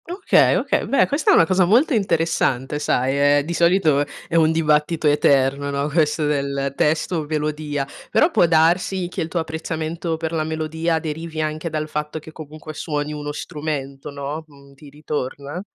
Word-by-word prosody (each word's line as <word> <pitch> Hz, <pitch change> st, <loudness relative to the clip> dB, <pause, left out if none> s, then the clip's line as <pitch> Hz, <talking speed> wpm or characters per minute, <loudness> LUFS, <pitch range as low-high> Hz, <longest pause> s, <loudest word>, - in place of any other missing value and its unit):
Okay, 375 Hz, +3 st, +3 dB
okay, -, -, 0 dB
beh, 275 Hz, -, +3 dB
questa 285 Hz, +2 st, 0 dB
è -, -, +6 dB
una -, -, +6 dB
cosa 185 Hz, +2 st, +3 dB
molto 245 Hz, -, +3 dB
interessante 165 Hz, -, 0 dB
sai, 140 Hz, +1 st, +2 dB
ehm, -, -, -2 dB
di 170 Hz, -, -3 dB
solito 170 Hz, -4 st, +3 dB, 0.2 s
è -, -, -4 dB
un 160 Hz, -1 st, +4 dB
dibattito 155 Hz, 0 st, +1 dB
eterno, 140 Hz, -1 st, +2 dB
no, 140 Hz, 0 st, -1 dB
questo 150 Hz, 0 st, +1 dB
del 140 Hz, -1 st, -1 dB
testo 160 Hz, +2 st, 0 dB
melodia, 150 Hz, -2 st, -2 dB, 0.2 s
però 330 Hz, -, +3 dB
può 175 Hz, -, +4 dB
darsi 175 Hz, +3 st, +2 dB
che -, -, -4 dB
il 160 Hz, -, -2 dB
tuo 170 Hz, +1 st, -2 dB
apprezzamento 160 Hz, +1 st, -3 dB
per 160 Hz, 0 st, -3 dB
la 160 Hz, -2 st, -1 dB
melodia 160 Hz, +1 st, -1 dB
derivi 160 Hz, 0 st, -5 dB
anche 155 Hz, +2 st, -2 dB
dal 155 Hz, -1 st, -3 dB
fatto 150 Hz, 0 st, -4 dB
che, 160 Hz, 0 st, -10 dB
comunque, 155 Hz, 0 st, -10 dB
suoni 150 Hz, -1 st, -3 dB
uno 145 Hz, 0 st, -5 dB
strumento, 145 Hz, -3 st, -5 dB
no, 145 Hz, +2 st, -5 dB
mhmm, 140 Hz, -2 st, -18 dB
ti 145 Hz, +1 st, -15 dB
ritorna? 145 Hz, +1 st, -5 dB
155 Hz, 170 wpm, -21 LUFS, 145-165 Hz, 0.2 s, è